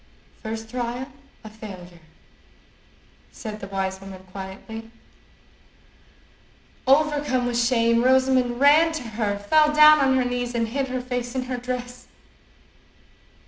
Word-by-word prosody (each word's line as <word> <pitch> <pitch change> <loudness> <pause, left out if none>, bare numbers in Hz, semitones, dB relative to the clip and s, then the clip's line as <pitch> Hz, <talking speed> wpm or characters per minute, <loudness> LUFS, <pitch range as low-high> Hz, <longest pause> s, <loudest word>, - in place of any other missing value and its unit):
"First 220 0 -6
trial 245 +2 -4 0.3
a 215 - -9
failure," 185 -5 -11 1.3
said 215 -2 -8
the 195 - -7
wise 190 -1 -3
woman 190 -1 -10
quietly. 200 +4 -8 2.0
Overcome 285 -2 +2
with 240 -1 -1
shame, 235 -1 +2
Rosamond 260 -1 +2
ran 305 +4 +5
to 315 -5 -4
her, 215 -3 -2
fell 300 +9 +3
down 305 0 +7
on 265 -2 +3
her 255 - +1
knees, 245 0 -3
and 230 -1 0
hid 270 +3 -2
her 255 -1 -3
face 245 0 -4
in 260 - -1
her 250 0 -4
dress. 250 0 -6
245 Hz, 125 wpm, -23 LUFS, 220-260 Hz, 2.0 s, down